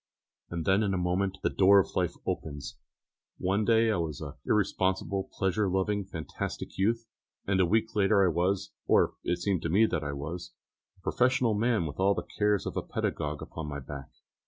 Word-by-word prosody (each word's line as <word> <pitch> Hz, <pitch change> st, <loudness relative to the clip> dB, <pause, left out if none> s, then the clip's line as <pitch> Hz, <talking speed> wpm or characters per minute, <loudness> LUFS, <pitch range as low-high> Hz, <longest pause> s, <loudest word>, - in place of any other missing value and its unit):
And 85 Hz, -2 st, -4 dB
then 95 Hz, +2 st, +4 dB
in 100 Hz, -3 st, +1 dB
a -, -, 0 dB
moment 95 Hz, +2 st, 0 dB
the -, -, +3 dB
door 100 Hz, +1 st, +6 dB
of 95 Hz, -, -1 dB
life -, -, 0 dB
opens. 70 Hz, -2 st, -4 dB, 0.6 s
One 95 Hz, +3 st, +1 dB
day 115 Hz, 0 st, +4 dB
I 105 Hz, -, +1 dB
was 80 Hz, -4 st, -3 dB
an 75 Hz, -3 st, -6 dB
irresponsible, 95 Hz, -1 st, 0 dB
pleasure 95 Hz, +1 st, 0 dB
loving, 95 Hz, +2 st, 0 dB
fantastic 80 Hz, -5 st, -5 dB
youth, 115 Hz, +4 st, +1 dB, 0.4 s
and 95 Hz, -1 st, +1 dB
a 90 Hz, -, +4 dB
week 110 Hz, +3 st, +1 dB
later 100 Hz, -1 st, +4 dB
I -, -, +4 dB
was, 95 Hz, +3 st, 0 dB, 0.2 s
or -, -, +4 dB
it 90 Hz, -, 0 dB
seemed 90 Hz, 0 st, 0 dB
to 85 Hz, -, -2 dB
me 100 Hz, +7 st, +5 dB
that 80 Hz, -8 st, -1 dB
I 70 Hz, -1 st, -3 dB
was, 85 Hz, +5 st, -6 dB, 0.4 s
a -, -, -26 dB
professional 125 Hz, +2 st, +2 dB
man 110 Hz, -3 st, +1 dB
with 75 Hz, +1 st, -6 dB
all 100 Hz, +1 st, +4 dB
the -, -, -3 dB
cares 105 Hz, -1 st, +2 dB
of -, -, -4 dB
a -, -, +1 dB
pedagogue 75 Hz, 0 st, -3 dB
upon 80 Hz, -2 st, -6 dB
my 70 Hz, 0 st, -4 dB
back. 70 Hz, 0 st, -8 dB
95 Hz, 195 wpm, -29 LUFS, 85-105 Hz, 0.6 s, door